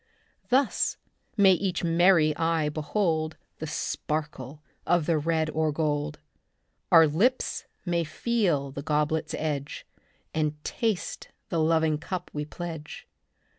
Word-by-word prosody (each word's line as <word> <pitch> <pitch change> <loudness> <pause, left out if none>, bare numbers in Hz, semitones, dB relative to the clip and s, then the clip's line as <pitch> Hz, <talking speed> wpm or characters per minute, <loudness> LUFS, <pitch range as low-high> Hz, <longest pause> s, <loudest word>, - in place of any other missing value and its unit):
Thus 265 +2 +2 0.4
may 195 -2 +7
each 185 0 -1
merry 165 -2 +4
eye 165 -2 +1
behold 155 0 -1 0.2
The 155 - -4
sparkle 150 -2 -4 0.2
of 175 -2 +2
the 165 -2 +2
red 160 0 0
or 155 0 +1
gold. 150 -1 -1 0.7
Our 165 -1 +9
lips 205 - +1 0.2
may 170 -1 +1
feel 165 - 0
the 140 - -6
goblet's 150 +1 0
edge 145 -3 -3 0.5
And 155 -1 0
taste 220 -6 -2 0.2
the 165 - 0
loving 160 -1 +2
cup 180 +2 -5
we 150 0 -3
pledge. 160 -2 -7
160 Hz, 120 wpm, -27 LUFS, 150-175 Hz, 0.7 s, Our